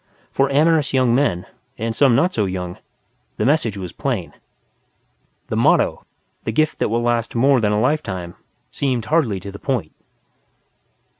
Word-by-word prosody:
For 135 0 +1
amorous 150 0 +3
young 130 -2 +3
men, 120 -10 +1 0.3
and 115 +1 -3
some 130 0 +4
not 175 +8 +2
so 105 - +1
young, 90 -2 -4 0.6
the - - 0
message 125 -7 +1
was 90 -3 -6
plain. 120 - -3 1.2
The - - -2
motto, - - +2 0.4
"The - - -2
Gift 155 +6 +1
That - - +1
Will 115 +2 0
Last 120 -1 0
More 130 +1 +4
Than 105 -1 +2
a 105 - +1
Lifetime", 100 - -1 0.4
seemed 125 -5 -1
hardly 130 - +1
to 100 +2 -8
the 100 - -10
point. 120 - -2
120 Hz, 155 wpm, -20 LUFS, 100-140 Hz, 1.2 s, some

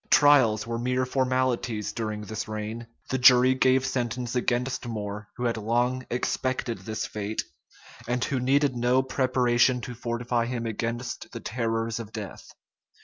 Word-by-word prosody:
[*] - - -34
Trials 135 -8 +5
were 115 0 -3
mere 125 +1 0
formalities 130 -4 0
during 110 -2 -3
this 105 0 -5
reign: 110 +2 -5 0.2
the 130 - 0
jury 125 0 +7
gave 130 0 +3
sentence 125 -1 -2
against 125 +1 -1
More, 105 -2 -5
who 125 - -4
had 115 -1 0
long 120 +4 0
expected 125 0 -1
this 110 -1 -4
fate, 105 +1 -3 0.6
and 120 +1 0
who 135 -1 -1
needed 135 +1 +2
no 125 +2 +2
preparation 130 -1 +2
to 125 - -6
fortify 120 0 -1
him 120 -1 -3
against 115 +2 -4
the 115 - -5
terrors 115 -1 -2
of 110 -2 -7
death. 105 -3 -8
120 Hz, 150 wpm, -27 LUFS, 115-130 Hz, 0.6 s, jury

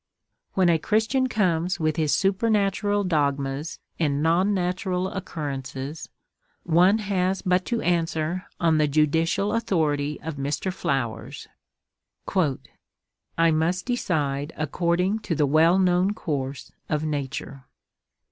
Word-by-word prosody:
When 185 -2 +4
a 165 -2 +3
Christian 220 - +1
comes 180 -5 0
with 155 -1 +1
his 155 -3 +1
supernatural 205 0 +1
dogmas 145 -3 -1 0.2
and 145 -2 +1
non 175 +5 +3
natural 185 0 -1
occurrences, 145 -5 -5 0.5
one 180 +5 +4
has 190 -3 -1
but 185 0 +2
to 235 -2 -1
answer 170 +1 -1
on 165 -2 +3
the 150 - +3
judicial 160 +7 +1
authority 150 -10 0
of 155 -1 -5
Mr. 145 +7 -2
Flowers: 130 -10 -3 1.9
"I 165 0 +4
must 165 +4 0
decide 150 - -1
according 175 +6 0
to 185 -6 -3
the 150 - +2
well 160 +5 +4
known 185 +2 +2
course 140 -7 -4 0.2
of 150 0 0
nature." 140 -2 -4
165 Hz, 115 wpm, -25 LUFS, 150-190 Hz, 1.9 s, When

